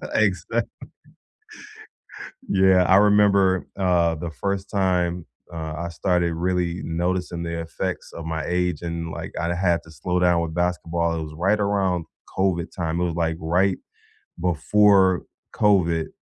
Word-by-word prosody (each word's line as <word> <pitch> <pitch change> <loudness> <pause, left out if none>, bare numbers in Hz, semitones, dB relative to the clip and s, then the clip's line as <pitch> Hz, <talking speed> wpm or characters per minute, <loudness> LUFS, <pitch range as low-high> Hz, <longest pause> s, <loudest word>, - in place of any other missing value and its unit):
Exactly. - - +1 1.9
Yeah, 95 -1 +4
I 95 - +5
remember, 100 -2 +4
uh, 90 -3 +2
the 80 +2 -5
1st 100 +4 -3
time, 90 -3 0 0.3
uh, 80 -2 -5
I 85 - -3
started 85 -1 0
really 90 0 -1
noticing 85 +1 -2
the 85 0 -3
effects 90 +3 -5
of 85 - -8
my 80 -1 -3
age 90 -2 -1
and, 85 -1 -4
like, - - -7
I 85 +1 -1
had 85 -1 +1
to 85 - -15
slow 90 +4 -2
down 90 -1 +3
with 80 -1 -4
basketball, 85 -1 -1
it - - -3
was 75 0 -8
right 95 +6 +1
around 95 -4 0 0.3
COVID 95 -3 0
time. 85 -2 -2
It - - +1
was, 85 -2 -2
like, 80 -1 -1
right 90 +4 +1 0.6
before 95 +2 +3 0.3
COVID, 85 -6 +2
90 Hz, 145 wpm, -23 LUFS, 85-95 Hz, 1.9 s, I